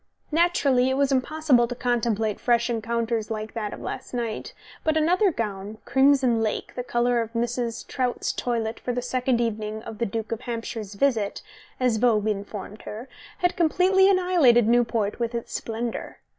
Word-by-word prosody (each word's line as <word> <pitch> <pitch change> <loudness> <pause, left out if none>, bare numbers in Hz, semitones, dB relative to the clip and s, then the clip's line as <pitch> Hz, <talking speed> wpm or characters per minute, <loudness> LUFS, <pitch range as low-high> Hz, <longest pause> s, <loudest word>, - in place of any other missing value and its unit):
Naturally 290 -6 +3
it 265 - 0
was 280 0 +2
impossible 270 -2 +2
to 245 - -5
contemplate 230 -4 0
fresh 240 0 +2
encounters 230 -1 -1
like 215 0 -4
that 215 -3 -3
of - - -7
last - - -6
night, 230 -3 -3 0.3
but 315 0 +2
another 360 +6 +3
gown, 210 -4 -4
crimson 265 -4 +4
lake, 215 -1 -2
the 250 - -3
colour 240 -1 +1
of 225 -1 -5
Mrs. 235 0 -2
Trout's 250 -2 -1
toilet 230 -2 -2
for 245 - -3
the 245 0 -2
second 250 -1 0
evening 220 -1 -2
of 220 - -8
the 235 - 0
Duke 220 +2 -4
of 230 - -3
Hampshire's 225 -3 -5
visit, 220 -4 0 0.4
as 250 -3 +2
Vogue 220 -2 +2
informed 205 0 -5
her, 230 +5 -8 0.4
had 355 - +2
completely 370 +3 +4
annihilated 345 - +4
Newport 230 -3 +1
with 235 0 -2
its 235 - -5
splendour. 230 +1 -4
235 Hz, 165 wpm, -25 LUFS, 225-260 Hz, 0.4 s, crimson